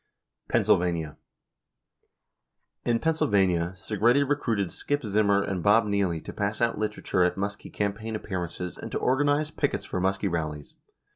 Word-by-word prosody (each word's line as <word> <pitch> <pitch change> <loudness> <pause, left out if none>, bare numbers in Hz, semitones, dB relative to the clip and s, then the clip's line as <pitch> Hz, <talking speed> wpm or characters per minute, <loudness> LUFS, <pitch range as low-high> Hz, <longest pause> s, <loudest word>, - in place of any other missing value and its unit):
176 85 -4 +2
Pennsylvania: - - -26 1.7
In 120 -1 +3
Pennsylvania, 95 - +1
Segretti 115 +8 +2
recruited 115 -10 0
Skip 145 -3 -2
Zimmer 100 -1 +3
and 95 -3 -2
Bob 105 +5 +5
Nieley 100 -5 0
to - - -6
pass 105 +1 -2
out 115 -3 +1
literature 105 -3 0
at 90 - +2
Muskie 100 +1 -4
campaign 105 +2 -2
appearances 90 -3 -5
and - - -7
to - - -1
organize 145 +3 +1
pickets 145 -2 -1
for 90 - -3
Muskie 95 +2 0
rallies. 75 -4 -3
100 Hz, 140 wpm, -27 LUFS, 90-115 Hz, 1.7 s, Bob